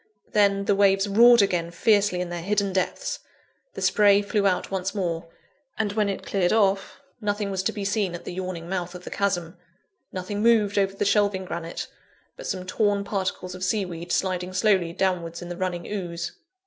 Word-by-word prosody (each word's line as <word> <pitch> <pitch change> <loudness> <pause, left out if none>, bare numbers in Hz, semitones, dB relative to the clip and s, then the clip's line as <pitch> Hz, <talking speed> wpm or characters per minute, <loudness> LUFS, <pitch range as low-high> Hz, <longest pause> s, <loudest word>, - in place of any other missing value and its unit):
Then, 200 -1 +3
the 205 - +3
waves 195 0 +3
roared 235 +2 +7
again 175 -4 0
fiercely 200 0 +2
in 180 - -3
their 175 -1 -4
hidden 200 +1 0
depths; 195 - -1 0.6
the - - -4
spray 205 -1 +5
flew 200 -1 +1
out 185 0 0
once 190 +1 -2
more; 170 -4 -2 0.5
and 210 -2 -1
when 210 -1 +1
it 195 - -4
cleared 185 -3 +1
off; 195 -3 +1 0.2
nothing 205 -1 -1
was 190 -1 -1
to 200 - 0
be 205 -2 -5
seen 200 -3 0
at 175 - -9
the - - -5
yawning 180 -2 -5
mouth 180 -1 -3
of 180 - -9
the - - -8
chasm 180 -3 -1 0.5
nothing 190 +3 -4
moved 215 -3 +4
over 195 0 +1
the 200 - -1
shelving 200 -2 +2
granite, 170 -1 -5 0.5
but - - -8
some 185 -1 -3
torn 205 +1 +1
particles 190 -2 -3
of 185 0 -7
sea 200 +1 +1
weed 175 -1 -7
sliding 185 -1 -1
slowly 185 -3 +2
downwards 170 -2 -1
in 175 - -8
the 175 - -4
running 175 -1 -3
ooze. 175 -5 -4
195 Hz, 190 wpm, -25 LUFS, 180-205 Hz, 0.6 s, roared